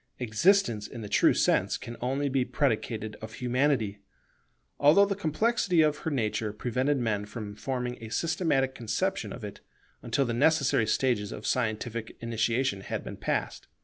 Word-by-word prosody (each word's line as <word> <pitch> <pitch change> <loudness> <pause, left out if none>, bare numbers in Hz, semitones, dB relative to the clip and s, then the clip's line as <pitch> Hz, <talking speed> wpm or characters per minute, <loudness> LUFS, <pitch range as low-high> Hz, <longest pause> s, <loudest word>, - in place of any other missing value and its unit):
Existence 120 - +2
in 120 - -8
the 105 - -6
true - - +4
sense - - +2
can 120 - -8
only 135 +3 0
be 135 -1 +1
predicated 110 -5 -1
of 110 0 -8
Humanity; 125 -5 0 0.8
although 155 +8 +6
the 200 - -1
complexity 185 +1 +1
of 150 -1 +1
her - - -3
nature 110 -5 -1
prevented 130 +6 0
men 110 -5 -1
from 105 -1 -6
forming 125 0 -4
a 110 - -7
systematic 155 -3 0
conception 190 - -2
of 120 - -8
it, 105 - -7 0.4
until 140 - 0
the 120 - -2
necessary 140 -3 +3
stages 110 -3 +1
of 105 - -7
scientific 115 -1 -2
initiation 115 -1 0
had - - -4
been - - -7
passed. - - -2
125 Hz, 155 wpm, -28 LUFS, 110-145 Hz, 0.8 s, although